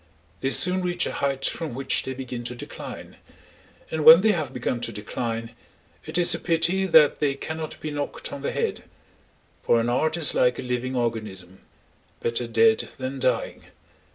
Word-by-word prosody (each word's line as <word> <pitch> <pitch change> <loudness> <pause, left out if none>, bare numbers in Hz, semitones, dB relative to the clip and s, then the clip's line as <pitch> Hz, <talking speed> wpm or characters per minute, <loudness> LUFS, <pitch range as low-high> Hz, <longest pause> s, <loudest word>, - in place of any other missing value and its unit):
They 135 - -1
soon 180 +6 +3
reach 175 -1 0
a - - -3
height 135 -1 -2
from 160 -7 -2
which 135 +1 0
they 130 - -6
begin 125 -2 -6
to 125 - -5
decline, - - -9 0.7
and 160 -1 -2
when 160 +3 +10
they 220 +1 +4
have 155 -9 -2
begun 125 -1 -3
to 115 - -4
decline 115 +2 -5 0.5
it - - -2
is 175 -1 +6
a - - -2
pity 175 +3 +1
that 155 -4 +5
they 140 -2 +1
cannot 160 +2 -6
be 155 - -4
knocked 145 -1 -5
on 140 - -7
the 140 - -2
head; - - -3 0.8
for 115 - +3
an 115 +1 0
art 155 +7 0
is 160 -4 +3
like 125 0 +2
a - - -5
living 125 +1 -3
organism—better 110 +1 -5
dead 115 -1 +3
than 130 +1 -5
dying. - - -1
130 Hz, 175 wpm, -24 LUFS, 120-160 Hz, 0.8 s, when